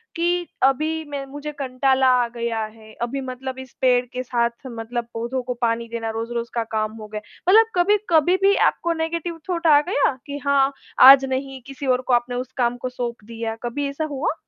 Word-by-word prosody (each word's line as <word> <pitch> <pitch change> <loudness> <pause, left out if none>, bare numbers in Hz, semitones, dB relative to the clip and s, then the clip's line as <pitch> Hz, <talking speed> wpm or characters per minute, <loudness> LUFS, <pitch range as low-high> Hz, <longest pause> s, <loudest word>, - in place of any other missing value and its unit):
कि 350 +1 0 0.2
अभी 310 +4 +2
मैं 280 -1 -4
मुझे 290 +2 -7
कंटाला 265 0 +2 0.2
आ - - -2
गया 230 -2 -2
है, 220 0 -14
अभी 270 +3 -2
मतलब 260 0 -6
इस 260 -1 -10
पेड़ 250 -1 +3
के 250 +1 -5
साथ 235 -1 +1 0.2
मतलब 235 0 -5
पौधों 235 +3 -3
को 250 0 -3
पानी 230 0 0
देना 230 -1 -3
रोज़-रोज़ 230 +1 -4
का 230 -1 0
काम 215 0 0
हो 215 - -8
गया। 210 0 -6 0.3
मतलब 445 +3 +7
कभी-कभी 355 -3 +3
भी 395 +1 +5 0.2
आपको 340 0 -2
नेगेटिव 330 +1 -3
थॉट 340 -1 0
आ 290 -2 +7
गया 380 - +2
कि 285 -1 -5
हाँ, 280 -1 +3 0.3
आज 270 +1 +10
नहीं 265 0 -4
किसी 275 0 -7
और 255 0 +2
को 250 - +2
आपने 240 +1 +1
उस 255 +1 -4
काम 245 -1 +1
को 255 +1 -4
सौंप 240 -3 -5
दिया। 225 0 -5
कभी 280 +4 -2
ऐसा 280 +3 -3
हुआ? 280 +1 -1
260 Hz, 200 wpm, -22 LUFS, 235-290 Hz, 0.3 s, आज